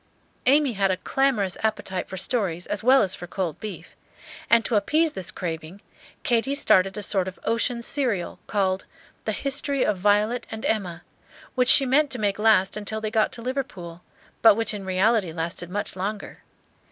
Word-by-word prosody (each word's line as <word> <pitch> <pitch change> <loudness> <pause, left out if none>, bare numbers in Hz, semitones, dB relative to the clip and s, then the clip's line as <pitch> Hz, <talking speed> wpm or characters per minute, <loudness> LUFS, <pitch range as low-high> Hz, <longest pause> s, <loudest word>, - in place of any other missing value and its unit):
Amy 280 -1 +4
had 195 -1 +1
a 185 - 0
clamorous 215 -5 0
appetite 210 -4 -2
for 190 - -6
stories 190 -4 -2
as 205 +1 -3
well 260 +1 +6
as 190 - -1
for 175 - -7
cold 175 -4 -3
beef; 215 -2 -8 0.5
and 230 -1 +5
to 235 - 0
appease 305 +10 +2
this 185 -2 -4
craving, 165 +1 -6 0.4
Katy 245 +4 +1
started 195 -8 +3
a 210 - -4
sort 190 -2 0
of 185 - -7
ocean 235 +1 0
serial, 235 -10 -1
called 190 -2 0 0.4
"The - - 0
History 280 -1 0
of 200 -3 0
Violet 210 +5 +1
and 220 0 -6
Emma," 180 -6 -2 0.5
which 250 -1 +2
she 275 - +8
meant 285 +3 +3
to 250 - -2
make 205 -1 -1
last 210 -3 +3
till 220 - -2
they 215 -1 -4
got 220 -1 +2
to 235 - -7
Liverpool, 230 -10 -5 0.4
but 220 -2 +7
which 225 0 -1
in 200 -2 -6
reality 190 0 +2
lasted 165 +1 -4
much 205 +1 -2
longer. 200 +3 -5
210 Hz, 175 wpm, -24 LUFS, 185-240 Hz, 0.5 s, she